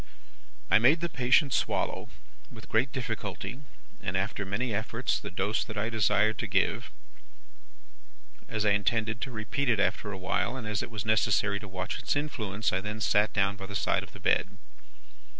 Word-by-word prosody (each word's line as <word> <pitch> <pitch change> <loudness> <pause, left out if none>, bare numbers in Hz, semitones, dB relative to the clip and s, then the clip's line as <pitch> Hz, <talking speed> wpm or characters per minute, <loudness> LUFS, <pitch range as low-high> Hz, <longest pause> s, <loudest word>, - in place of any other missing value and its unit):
"I - - +7
made 135 +8 +5
the 170 - -1
patient 125 +2 +3
swallow, - - 0 0.4
with - - -12
great 125 +4 +2
difficulty, 120 -1 -4 0.4
and 95 +1 -1
after 100 +1 -2
many 110 +4 -1
efforts, 115 +4 -1
the - - -7
dose 100 +4 0
that 110 - -8
I 110 +3 -1
desired 105 0 +2
to 115 - -2
give. 95 -1 +1 1.6
As 110 -1 -1
I 105 - +4
intended 110 +3 +1
to 135 - -3
repeat 120 +5 -2
it 110 -4 +3
after 105 +1 0
a 95 - -5
while, 95 +6 -1
and 120 - -6
as 105 0 -1
it - - -5
was 110 -3 -5
necessary 105 -2 +2
to 100 - -9
watch 95 -1 -4
its - - 0
influence, 110 -9 -1
I 95 - +1
then 105 +2 -4
sat 105 -1 +3
down 100 0 +1
by 95 0 -7
the 100 - -7
side - - +2
of - - -11
the - - -11
bed. - - +1
110 Hz, 185 wpm, -29 LUFS, 100-120 Hz, 1.6 s, I